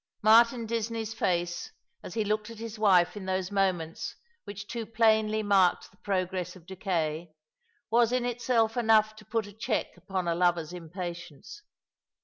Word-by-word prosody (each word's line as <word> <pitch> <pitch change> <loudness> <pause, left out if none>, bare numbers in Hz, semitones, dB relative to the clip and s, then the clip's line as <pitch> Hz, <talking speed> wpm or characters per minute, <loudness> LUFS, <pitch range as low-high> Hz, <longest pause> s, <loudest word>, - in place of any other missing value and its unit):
Martin 230 +2 +5
Disney's 225 0 -3
face, 175 -5 -1 0.3
as - - -9
he 220 -2 0
looked 210 +1 -1
at 230 - -10
his 225 -1 -7
wife 180 -4 +4
in 195 -2 -7
those 190 0 -1
moments 185 -5 -1 0.3
which 205 +1 -7
too 235 -1 -4
plainly 220 -1 +2
marked 195 -3 +3
the 195 - -26
progress 185 -2 -2
of 175 -3 -15
decay, 170 -4 -2 0.6
was 235 0 +4
in 250 -1 +1
itself 235 -2 +1
enough 220 -2 +3
to 215 - -14
put 220 +1 -2
a 205 - -12
check 220 +1 -2
upon 185 0 -4
a 170 - +2
lover's 175 -1 +1
impatience. 175 - -8
205 Hz, 155 wpm, -28 LUFS, 180-225 Hz, 0.6 s, Martin